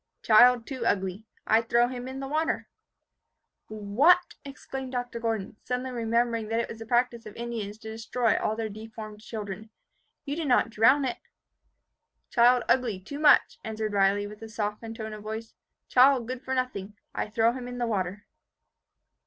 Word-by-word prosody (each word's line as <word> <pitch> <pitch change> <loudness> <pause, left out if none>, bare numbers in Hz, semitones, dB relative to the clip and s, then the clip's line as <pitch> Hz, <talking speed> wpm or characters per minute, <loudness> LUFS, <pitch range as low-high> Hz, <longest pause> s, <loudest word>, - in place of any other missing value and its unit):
Child 240 +1 +6
too 260 -4 -5
ugly. 195 0 -1 0.2
I 220 +1 +4
throw 235 +1 +3
him 250 0 -6
in 265 +1 -6
the 270 - -4
water." 310 +3 -1 1.0
"What!" 250 - +3
exclaimed 270 -1 -7
Dr. 245 -1 -3
Gordon, 225 -2 -3
suddenly 250 +1 -3
remembering 230 -1 0
that 225 +1 0
it 235 - -1
was 225 - -8
the 225 - -8
practice 240 -1 +1
of 210 - -11
the - - -11
Indians 220 -3 -4
to 220 0 -8
destroy 225 +1 0
all 215 - 0
their 225 0 -2
deformed 215 0 -9
children. 215 -1 -7 0.6
"You 285 0 -3
did 320 -2 -3
not 245 -2 +3
drown 260 +6 +4
it?" 250 - -3 1.1
"Child 245 0 +5
ugly 240 -7 +1
too 285 +10 -8
much," 300 -2 +5
answered 220 -1 -3
Riley, 200 +1 +3
with 210 +1 -10
a 225 - -8
softened 220 +1 -4
tone 220 -1 -6
of 210 - -8
voice. 220 +1 -6 0.3
"Child 255 -2 +5
good 255 0 -5
for 265 0 -3
nothing. 215 -6 -3 0.2
I - - -3
throw 225 +2 +3
him 250 -1 -6
in 245 0 -6
the 240 - 0
water." 200 -3 -2
230 Hz, 175 wpm, -27 LUFS, 215-250 Hz, 1.1 s, Child